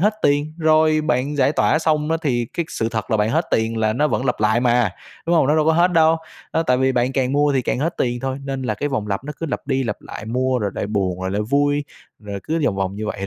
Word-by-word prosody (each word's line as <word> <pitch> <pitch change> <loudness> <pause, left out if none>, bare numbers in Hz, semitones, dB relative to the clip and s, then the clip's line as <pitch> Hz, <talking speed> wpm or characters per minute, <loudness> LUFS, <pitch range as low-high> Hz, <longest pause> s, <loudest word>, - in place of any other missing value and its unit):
hết 210 +4 +3
tiền, 145 +2 +1
rồi 155 -1 +3
bạn 140 0 -1
giải 140 0 +3
tỏa 155 - +2
xong 155 -1 0
á, 165 - +2
thì 120 -6 0
cái 170 - -2
sự 115 - -2
thật 110 -2 -4
là 110 - +3
bạn 105 +1 +1
hết 160 +6 +1
tiền 115 0 +1
là 110 -1 +1
nó 150 +7 +1
vẫn 130 - -1
lặp 125 - +1
lại 110 +2 +3
mà, 120 -3 +2 0.4
đúng 170 +1 +3
hông? 160 - +4
Nó 150 +3 +3
đâu 155 -1 +2
có 160 - +5
hết 175 +2 +3
đâu, 160 -1 +4 0.4
đó, 165 - +1
tại 125 -6 +2
vì 130 0 +2
bạn 125 +1 +1
càng 130 -1 0
mua 145 0 +3
thì 130 -2 +1
càng 120 - -1
hết 160 +5 -1
tiền 120 -1 -1
thôi, 135 +1 -3
nên 135 -1 -4
là 130 - -1
cái 145 - -2
vòng 130 -7 -2
lặp 100 +5 -2
nó 150 - -5
cứ 165 - -2
lặp 145 - -4
đi 135 -1 0
lặp 120 - -2
lại - - -8
mua 130 +2 0
rồi 105 -3 -1
lại - - -3
buồn 95 -4 -1
rồi 95 0 -2
lại 100 +2 -1
vui, 145 +1 +2 0.3
rồi 100 -2 -7
cứ 165 +1 -1
vòng 95 - 0
vòng 95 0 -2
như 110 +1 -4
vậy 100 -2 -4
130 Hz, 290 wpm, -21 LUFS, 110-150 Hz, 0.4 s, có